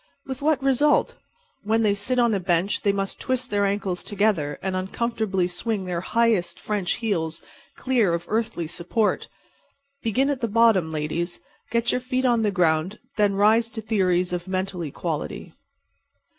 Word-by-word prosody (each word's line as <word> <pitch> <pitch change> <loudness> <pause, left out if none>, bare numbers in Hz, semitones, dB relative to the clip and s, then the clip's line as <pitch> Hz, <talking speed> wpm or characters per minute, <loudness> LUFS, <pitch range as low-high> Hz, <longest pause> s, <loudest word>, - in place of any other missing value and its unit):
With 265 +1 -6
what 290 -2 +2
result? 275 +2 +3 0.5
When 225 +2 +1
they 205 -2 +3
sit 205 +6 -2
on 235 -2 +4
a 200 - +1
bench 180 +1 0
they 200 - +3
must 195 -1 -3
twist 255 -1 -2
their 205 -1 +2
ankles 195 -3 -2
together 195 -9 0
and 190 -1 -1
uncomfortably 195 0 -1
swing 190 +3 -2
their 175 -2 -2
highest 230 -3 +1
French 205 -4 -1
heels 165 -8 -2 0.4
clear 235 -10 +2
of 170 - -5
earthly 220 -5 -1
support. 180 +7 -1 0.7
Begin 260 +6 +1
at 270 -3 -3
the 230 - +1
bottom, 220 -7 +4
ladies. 160 +3 -2 0.3
Get 235 +1 +1
your 250 - 0
feet 255 +1 -1
on 240 -2 +3
the 215 - +2
ground, 175 -1 +1
and - - -36
then 205 -2 +3
rise 220 +3 +4
to 230 - -6
theories 185 -5 +1
of 175 +1 -3
mental 185 -1 -2
equality. 150 -4 -4
205 Hz, 165 wpm, -24 LUFS, 180-230 Hz, 0.7 s, on